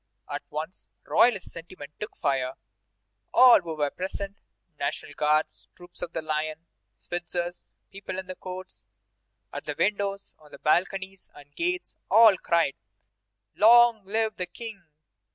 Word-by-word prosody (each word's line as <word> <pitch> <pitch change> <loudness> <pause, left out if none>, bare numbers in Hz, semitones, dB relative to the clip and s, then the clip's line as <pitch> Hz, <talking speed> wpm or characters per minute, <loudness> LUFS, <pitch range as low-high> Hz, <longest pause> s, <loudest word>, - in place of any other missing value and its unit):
At - - -4
once 160 +4 -6 0.2
royalist 230 -6 +3
sentiment 165 -3 -10
took 210 - -6
fire. 130 -2 0 0.8
All 250 -5 +8
who 165 -2 -5
were 145 -2 0
present 195 +2 -5 0.4
National 140 +1 -3
Guards, 150 +1 0
troops 175 0 -13
of 170 - -4
the 165 - -3
line, 155 +1 -3 0.3
Switzers, 175 0 -5 0.2
people 195 -1 -7
in 190 - -4
the 185 - -6
courts, 185 0 -9 0.7
at - - -6
the - - -4
windows, 200 -1 -1
on 150 -1 -14
balconies 190 +3 0
and 145 0 -16
gates 360 +1 -2
all 225 -3 +8
cried: 170 -5 +1 0.8
"Long 235 0 +6
live 220 +2 -1
the 180 - -3
King! 200 -1 -9
185 Hz, 135 wpm, -27 LUFS, 155-200 Hz, 0.8 s, All